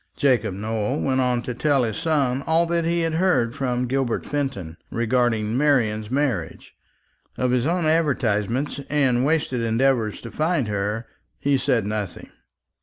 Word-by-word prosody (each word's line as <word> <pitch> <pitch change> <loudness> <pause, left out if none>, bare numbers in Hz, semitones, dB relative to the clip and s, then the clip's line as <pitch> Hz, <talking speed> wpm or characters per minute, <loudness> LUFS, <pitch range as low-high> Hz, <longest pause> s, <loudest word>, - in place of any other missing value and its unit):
Jacob 115 -8 +2
Nowell 110 +5 -2
went 130 -1 +1
on 125 -1 +1
to 125 - -4
tell 140 +1 +2
his 110 -3 -2
son 140 -5 0
all 165 +1 +3
that 170 0 0
he 170 +1 +1
had 165 -1 0
heard 160 -9 +2
from 125 -2 -1
Gilbert 130 -1 -1
Fenton 135 - -3
respecting 115 -2 0
Marian's 115 -7 +1
marriage. 130 - -2 0.6
Of 125 -1 +1
his 125 +2 +1
own 175 0 0
advertisements, 135 -5 0
and 130 -4 +2
wasted 145 -4 0
endeavours 115 -1 +1
to 115 - -8
find 155 -5 0
her, 105 +3 -2 0.3
he 140 0 +1
said 130 -5 +1
nothing. 105 -4 -4
125 Hz, 150 wpm, -23 LUFS, 115-145 Hz, 0.6 s, all